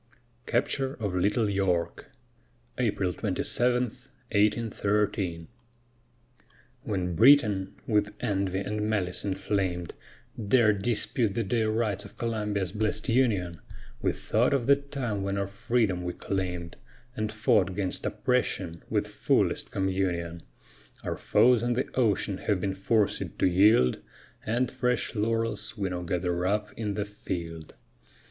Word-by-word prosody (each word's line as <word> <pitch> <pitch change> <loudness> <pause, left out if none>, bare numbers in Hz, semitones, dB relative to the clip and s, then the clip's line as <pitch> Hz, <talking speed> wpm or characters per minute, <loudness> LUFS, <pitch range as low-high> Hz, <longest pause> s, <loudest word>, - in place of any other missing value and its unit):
CAPTURE 135 +2 0
OF 105 -5 -3
LITTLE 105 +5 +2
YORK 95 - -1 0.7
[April 100 -6 0
27, 120 +6 0 0.5
1813] 105 -5 +1 1.3
When 95 -8 -2
Britain, 105 - +5
with 105 -2 +1
envy 95 -1 -1
and 105 +2 -3
malice 95 -4 0
inflamed, 95 -3 -2 0.5
Dared 105 -2 +3
dispute 115 -1 +1
the 115 - +1
dear 110 +1 0
rights 110 -2 0
of - - -13
Columbia's 105 -5 -1
bless'd 105 +3 -1
union, 105 - +1 0.4
We - - +2
thought 120 +5 +1
of 125 -4 0
the 140 - +6
time 135 -7 -4
when 100 0 -2
our 100 - 0
freedom 100 -2 0
we 90 0 -3
claim'd, 90 -3 -3 0.4
And 110 -2 -2
fought 105 -4 +2
'gainst 95 -3 -2
oppression 95 -9 -1
with - - +1
fullest - - +1
communion. 90 -3 -1 0.6
Our - - -2
foes 125 -2 +4
on 120 +1 +1
the 125 +2 -1
ocean 105 -5 +1
have 105 -3 0
been 95 +1 -1
forced 100 +2 +1 0.2
to - - +2
yield, 90 - +4 0.4
And 120 +3 0
fresh 125 -1 -1
laurels 115 0 -1
we 100 -2 -1
now 90 -1 -3
gather 90 0 -1
up 105 +2 -1
in 105 -3 -3
the 105 - -1
field. 85 -6 -6
105 Hz, 125 wpm, -28 LUFS, 95-115 Hz, 1.3 s, the